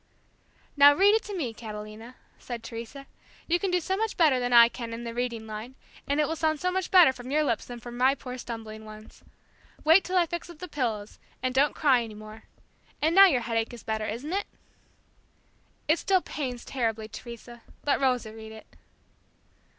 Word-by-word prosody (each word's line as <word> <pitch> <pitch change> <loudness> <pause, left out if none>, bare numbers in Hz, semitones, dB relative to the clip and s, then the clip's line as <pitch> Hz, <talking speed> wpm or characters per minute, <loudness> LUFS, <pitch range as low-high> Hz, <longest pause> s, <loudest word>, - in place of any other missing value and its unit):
"Now, 285 0 +8
read 400 +4 +5
it 440 - +3
to 410 -2 -5
me, 255 -9 -3
Catalina," 215 +2 -9 0.2
said 235 -2 -7
Teresa. 235 +4 -8 0.4
"You 345 +1 +1
can 390 - -1
do 360 0 +2
so 375 +3 -2
much 445 +2 -2
better 300 -7 +4
than 245 0 -2
I 235 -1 +9
can 235 -1 -7
in 230 +1 -6
the 235 -1 -5
reading 235 -2 -3
line, 220 +4 -8 0.3
and 285 +1 0
it 300 - +2
will 320 - -2
sound 315 -1 0
so 365 +3 0
much 375 0 -2
better 355 -8 +7
from 250 0 -10
your 305 +2 +2
lips 235 -6 -1
than 245 -1 -8
from 240 +1 -9
my 260 +2 +4
poor 255 -1 -8
stumbling 220 -2 -7
ones. 215 0 -13 0.6
Wait 325 +5 +6
till 370 0 -1
I 350 - +4
fix 345 +1 -6
up 340 - -11
the 360 - -7
pillows, 230 -9 -3 0.2
and 255 0 0
don't 275 +3 +2
cry 270 -6 +3
any 225 -2 -7
more. 215 +1 -12 0.5
And 315 +2 +2
now 390 +2 +9
your 265 -9 +1
headache 230 0 -2
is 235 - -13
better, 220 -1 -2
isn't 255 - -5
it?" 400 +1 -1 1.4
"It 310 +2 +3
still 380 -2 +2
pains 255 -5 -5
terribly, 225 -4 -2
Teresa. 235 +1 -10 0.2
Let 285 - +1
Rosa 250 -4 0
read 220 0 -10
it." 220 - -12
250 Hz, 200 wpm, -27 LUFS, 225-310 Hz, 1.4 s, I